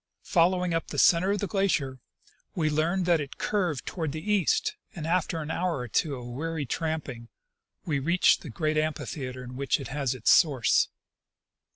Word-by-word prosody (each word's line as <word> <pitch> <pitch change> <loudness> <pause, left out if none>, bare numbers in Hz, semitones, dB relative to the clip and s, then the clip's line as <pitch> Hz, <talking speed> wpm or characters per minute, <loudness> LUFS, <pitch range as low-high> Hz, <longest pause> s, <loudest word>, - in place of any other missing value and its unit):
Following 180 0 +2
up 165 - -1
the - - -6
center 180 +2 +5
of 205 - +2
the - - 0
glacier, 165 -10 0 0.6
we 155 -3 +1
learned 170 +5 +1
that 170 -3 +3
it 140 - -7
curved 180 - -1
toward 160 -6 -3
the 160 +7 -3
east; 210 - +2 0.2
and 160 -3 -5
after 170 -1 0
an 150 - -5
hour 175 -1 -1
or 125 -1 -5
two 140 +5 0
of 125 -2 -8
weary 150 +5 -4
tramping 140 -4 -3 0.6
we 150 -6 0
reached 170 +6 +3
the 155 - -8
great 155 +5 -1
amphitheatre 140 -4 -4
in 125 0 -9
which 140 +2 0
it 135 - -7
has 135 -2 -1
its 120 - +3
source. 135 -8 +4
155 Hz, 180 wpm, -27 LUFS, 135-175 Hz, 0.6 s, center